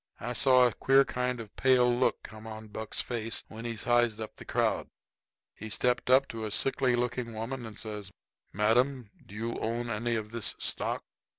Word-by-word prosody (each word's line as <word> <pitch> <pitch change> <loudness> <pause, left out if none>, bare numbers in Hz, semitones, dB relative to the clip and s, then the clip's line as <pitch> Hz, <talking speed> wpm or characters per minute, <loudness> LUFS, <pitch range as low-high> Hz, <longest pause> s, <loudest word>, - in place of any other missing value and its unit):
] - - -32
I - - -2
saw 130 +2 +6
a 120 - +2
queer 135 +1 +4
kind 125 -1 -2
of 110 -2 -7
a - - -14
pale 125 -2 +5
look 125 - +1
come 110 +1 -10
on 110 0 -8
Buck's 110 +1 -4
face 115 -2 -1
when 115 +1 -8
he 115 -1 -3
sized 120 0 +2
up 110 - -6
the - - -10
crowd. - - 0 0.7
He 110 - -8
stepped 125 +3 +1
up 130 +2 +6
to 115 -1 -5
a 110 - -2
sickly 130 +3 +1
looking 120 -1 -2
woman 115 +2 -4
and 110 - -11
says: 105 -3 -5 0.4
"Madam, 120 +3 +1
do 100 - -13
you 115 +2 -3
own 120 +1 -2
any 115 +2 -1
of 110 -1 -4
this 115 -3 0
stock?" - - -2
115 Hz, 200 wpm, -30 LUFS, 110-125 Hz, 0.7 s, saw